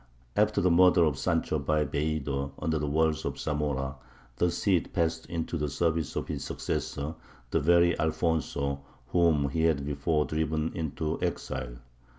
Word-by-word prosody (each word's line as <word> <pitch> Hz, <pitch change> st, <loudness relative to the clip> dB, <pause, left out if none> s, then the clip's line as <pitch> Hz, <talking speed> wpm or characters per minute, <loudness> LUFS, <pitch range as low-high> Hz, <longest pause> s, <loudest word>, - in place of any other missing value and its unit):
After 105 Hz, 0 st, +3 dB
the 90 Hz, -, +3 dB
murder 90 Hz, 0 st, +6 dB
of 75 Hz, -4 st, +1 dB
Sancho 80 Hz, -, 0 dB
by 75 Hz, +2 st, +1 dB
Bellido, 70 Hz, -1 st, -2 dB
under 80 Hz, -1 st, -1 dB
the 75 Hz, -, -1 dB
walls 80 Hz, +1 st, +1 dB
of -, -, -3 dB
Zamora, 70 Hz, -3 st, -2 dB, 0.4 s
the 90 Hz, -, +3 dB
Cid 90 Hz, 0 st, +1 dB
passed 80 Hz, -2 st, 0 dB
into 85 Hz, 0 st, -3 dB
the 75 Hz, 0 st, -1 dB
service 80 Hz, +1 st, 0 dB
of -, -, -2 dB
his -, -, -4 dB
successor, 70 Hz, +3 st, -3 dB, 0.4 s
the -, -, +3 dB
very 85 Hz, +3 st, +4 dB
Alfonso 75 Hz, -3 st, 0 dB, 0.3 s
whom 80 Hz, -5 st, +3 dB
he 80 Hz, +2 st, +1 dB
had 70 Hz, -4 st, +2 dB
before 75 Hz, +2 st, 0 dB
driven 80 Hz, 0 st, -1 dB
into 80 Hz, 0 st, -3 dB
exile. 65 Hz, -2 st, -3 dB
80 Hz, 155 wpm, -29 LUFS, 70-85 Hz, 0.4 s, murder